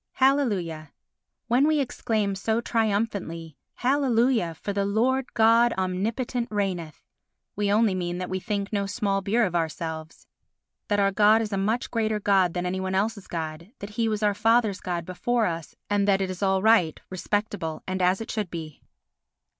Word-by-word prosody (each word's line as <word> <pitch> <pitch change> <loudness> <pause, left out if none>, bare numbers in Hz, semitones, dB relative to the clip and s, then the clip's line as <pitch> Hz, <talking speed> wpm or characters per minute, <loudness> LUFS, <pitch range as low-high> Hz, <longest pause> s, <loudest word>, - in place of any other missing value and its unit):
Hallelujah 200 - +1 0.5
When 250 +5 +3
we 310 -1 +2
exclaim 220 -6 -1
so 220 +4 0
triumphantly 200 -9 -1 0.2
"Hallelujah! 245 - +2
for 200 +5 -4
the 200 0 0
Lord 245 +6 +1
God 230 +1 +5
omnipotent 220 +7 -1
reigneth" 185 -7 -3 0.5
we 205 0 0
only 215 -1 +3
mean 175 -1 -2
that 180 0 -4
we 185 - -2
think 200 +1 -3
no 200 -1 0
small 200 -2 -1
beer 220 +5 +2
of 180 - -3
ourselves, 160 -1 -4 0.6
that 205 -1 +1
our 195 0 +3
God 210 +2 +5
is 220 -2 -3
a - - +1
much 220 +5 -1
greater 220 -2 0
God 190 -4 +2
than 180 0 -2
any 185 +1 -2
one 190 0 -2
else's 205 0 -1
God, 165 +2 -5
that 200 +1 -8
he 225 +1 0
was 215 0 -2
our 205 -1 +3
father's 225 -1 +2
God 175 -2 -3
before 230 +6 0
us, 165 -4 -4
and 205 -1 +1
that 195 -1 +4
it 190 -1 -1
is 185 - -8
all 190 -1 +2
right, 215 -8 +4
respectable 185 -3 -3
and 185 0 -3
as 180 +1 +3
it 225 - -5
should 210 -4 -2
be. 160 -3 -7
200 Hz, 175 wpm, -26 LUFS, 180-225 Hz, 0.6 s, God